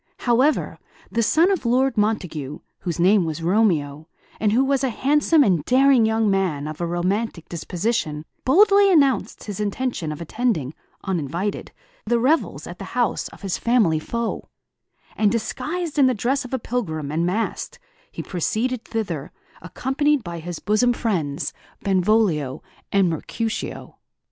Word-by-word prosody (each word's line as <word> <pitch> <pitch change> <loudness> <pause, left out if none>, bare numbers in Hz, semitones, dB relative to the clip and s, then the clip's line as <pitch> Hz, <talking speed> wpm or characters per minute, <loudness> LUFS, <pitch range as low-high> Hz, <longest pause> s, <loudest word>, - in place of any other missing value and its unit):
However, 255 +5 +2 0.3
the 230 - +1
son 325 - +4
of 380 - -1
Lord 255 +2 +2
Montague, 175 - -1 0.2
whose 175 -2 -4
name 190 +2 +5
was 165 0 -4
Romeo, 165 -6 +1 0.3
and 210 -1 +2
who 245 +5 +3
was 275 0 +1
a 265 - +2
handsome 295 +5 +3
and 180 - +2
daring 260 - +4
young 220 0 +1
man 185 -7 0
of 155 +2 -6
a 170 - 0
romantic 180 +2 -2
disposition, 170 -2 -2 0.2
boldly 400 +6 +5
announced 275 - +2
his 205 -2 -6
intention 210 -5 -2
of 150 - -6
attending, 170 - -1 0.3
uninvited, 175 +2 -3 0.3
the 240 - +1
revels 275 +7 +1
at - - -9
the - - -6
house - - +1
of - - -15
his 195 -2 -2
family 220 -10 +3
foe; 235 +8 -4 0.7
and, 210 -2 +2
disguised 305 +8 -3
in 270 - +6
the 255 - +1
dress 265 +6 0
of 250 - -9
a - - 0
pilgrim, 160 - -3
and 165 +3 0
masked, 225 - -2 0.3
he - - -6
proceeded 225 +7 -2
thither, 180 - -4 0.3
accompanied 270 - 0
by 170 -1 -6
his 175 +1 -6
bosom 230 +4 +2
friends, 170 - -2 0.3
Benvolio 185 - +1 0.3
and 195 -2 +3
Mercutio. 215 +7 -4
215 Hz, 150 wpm, -22 LUFS, 170-250 Hz, 0.7 s, in